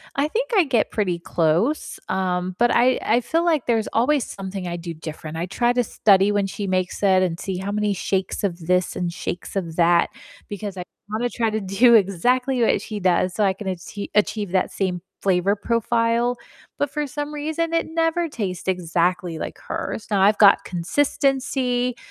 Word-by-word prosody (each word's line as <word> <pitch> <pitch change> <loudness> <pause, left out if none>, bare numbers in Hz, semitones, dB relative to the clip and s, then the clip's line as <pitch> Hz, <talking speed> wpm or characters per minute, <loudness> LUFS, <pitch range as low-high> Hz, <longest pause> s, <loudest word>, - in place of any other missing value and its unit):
I 280 +2 +1
think 480 +11 -2
I 385 - +6
get 245 -6 +1
pretty 185 -5 0
close, 170 - 0
um, 185 -1 -1
but 240 0 +4
I 250 +2 +3
I 235 +3 +2
feel 325 +8 0
like 320 -6 +1
there's 225 -2 +1
always 260 +4 +2
something 190 -1 -6
I 175 - -3
do 170 0 -6
different. 155 0 -7
I 170 - -2
try 240 +6 +1
to 245 0 +2
study 200 -2 +3
when 205 -1 +1
she 200 +1 -4
makes 185 -1 -1
it 190 -2 +4
and 170 -2 -2
see 190 -2 -4
how 195 +2 -4
many 210 0 0
shakes 190 +1 -2
of 180 -3 -1
this 180 0 +1
and 175 -1 -2
shakes 175 +1 -6
of 170 -5 -3
that, 170 0 +4 0.4
because 205 -1 -6
I 180 - -4 0.3
wanna 230 +3 -1
try 230 -2 0
to 220 0 -1
do 205 +5 +4
exactly 245 +6 +2
what 230 - +3
she 215 -2 -6
does, 185 -1 +2
so 215 - 0
I 195 -1 +3
can 200 +2 -10
achie 190 +3 -5
achieve 210 -2 0
that 185 -1 +1
same 180 -3 -2 0.2
flavor 190 0 +2
profile, 230 +2 0 0.4
but 285 - 0
for 300 +1 -2
some 290 +2 -5
reason, 315 +3 -2
it 330 - +1
never 330 +1 0
tastes 190 -9 -4
exactly 175 -1 0
like - - -6
hers. 220 - -4
Now, 200 -3 +2
I've 205 +2 +5
got 200 -2 +6
consistency, 250 +4 0
205 Hz, 190 wpm, -22 LUFS, 185-245 Hz, 0.4 s, I